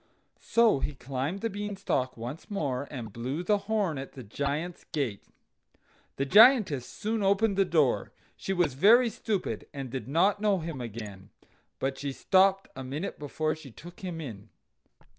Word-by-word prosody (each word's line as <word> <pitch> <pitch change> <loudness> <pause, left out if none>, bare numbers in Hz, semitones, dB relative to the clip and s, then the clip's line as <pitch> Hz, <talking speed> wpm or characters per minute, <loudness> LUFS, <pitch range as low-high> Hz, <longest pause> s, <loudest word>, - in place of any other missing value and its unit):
So 230 -10 +3
he 145 +1 -3
climbed 135 +9 -3
the 230 - 0
Beanstalk 200 -11 -2
once 120 +7 -7
more, 140 -9 -2
and 115 -7 -7
blew 130 - -3
the 205 +3 +2
horn 200 -10 +1
at 135 - -8
the 130 - -9
Giant's 145 - -3
gate. 130 -10 -3 0.9
The 135 - -1
Giantess 205 - +6
soon 220 +1 -3
opened 200 +1 +3
the 195 0 +3
door; 155 -7 +2 0.2
she - - -4
was 175 -7 +1
very 225 - +6
stupid, 210 -1 -3
and 135 -3 -5
did 130 0 -5
not 190 +8 +2
know 205 -2 +3
him 160 -6 -5
again,. 105 -4 -8 0.5
but 135 0 -2
she 140 -1 -3
stopped 195 +5 +3
a 130 - -6
minute 145 +8 -5
before 155 +2 -1
she 155 -3 -12
took 170 +9 -13
him 180 -3 -5
in. 110 -10 -8
155 Hz, 160 wpm, -29 LUFS, 130-195 Hz, 0.9 s, Giantess